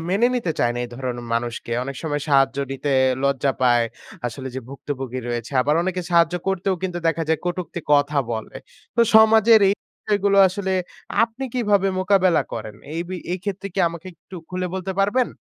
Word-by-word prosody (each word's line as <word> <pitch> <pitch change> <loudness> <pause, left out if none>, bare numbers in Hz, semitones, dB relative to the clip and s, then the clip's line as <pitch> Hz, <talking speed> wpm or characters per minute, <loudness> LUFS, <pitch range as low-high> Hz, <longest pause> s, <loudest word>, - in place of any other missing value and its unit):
মেনে 200 +6 +3
নিতে 230 -10 -1
চায় 120 - +2
না - - -4
এই - - -7
ধরনের 120 -1 -4
মানুষকে। 115 0 -3
অনেক 140 0 -6
সময় 145 -2 -2
সাহায্য 135 -1 +3 0.2
নিতে 140 +1 -3 0.3
লজ্জা 140 0 +1
পায়। 120 -2 +4 0.4
আসলে 130 +3 -6
যে 130 - -3
ভুক্তভুগি 135 -2 -5
রয়েছে। 120 +1 -4
আবার 150 +3 +2
অনেকে 185 0 -2
সাহায্য 170 0 +4
করতেও 190 0 0
কিন্তু 180 -2 -2
দেখা 165 0 +1
যায় 160 - +2
কটুক্তি 175 0 -3
কথা 145 0 +3
বলে। 110 -1 -5 0.4
তো - - +4 0.2
সমাজের 220 0 +7
এই 200 - +3 0.3
বিষয়গুলো 200 -1 +2
আসলে 190 0 -3 0.5
আপনি 230 +3 -2
কিভাবে 205 -5 +2
মোকাবেলা 185 -3 +3
করেন? 110 -2 -6 0.2
এই 165 - -2
বি 185 - -4 0.2
এই 185 - -2
ক্ষেত্রে 200 -1 -4
কি 195 - +1
আমাকে 170 +2 -9
একটু 170 +3 -16
খুলে 185 0 -3
বলতে 190 0 -3
পারবেন? 230 +6 +2
170 Hz, 180 wpm, -22 LUFS, 135-195 Hz, 0.5 s, সমাজের